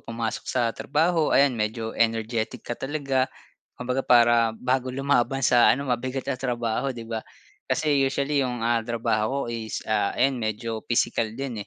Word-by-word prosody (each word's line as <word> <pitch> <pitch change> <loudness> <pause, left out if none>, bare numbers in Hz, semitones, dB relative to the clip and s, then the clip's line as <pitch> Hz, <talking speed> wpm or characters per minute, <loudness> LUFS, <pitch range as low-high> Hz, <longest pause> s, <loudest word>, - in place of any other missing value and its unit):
pumasok 115 -1 -3
sa 120 -3 +1
trabaho 160 +4 +1
ayan, 140 -1 +5
medyo 110 0 -3
energetic 115 0 -1
ka - - -4
talaga. 135 0 -1 0.5
Kumbaga 125 +1 -2
para 120 -3 +4
bago 130 0 0
lumaban 135 0 0
sa 120 -1 +5
ano 140 +2 +2
mabigat 130 +2 -3
na 130 -2 -3
trabaho, 120 0 -1
'di 120 -3 -6
ba? 115 -1 -4 0.5
Kasi 150 -3 +2
usually 140 +1 +1
yung, 125 -3 -2
ah, 120 0 +2
trabaho 115 +3 -1
ko 120 - -5
is, 110 -1 -5
ah, 105 -2 0
ayan 130 -1 +2
medyo 110 +1 -3
physical 115 -1 0
din, 130 -5 -4
120 Hz, 160 wpm, -25 LUFS, 115-135 Hz, 0.5 s, ayan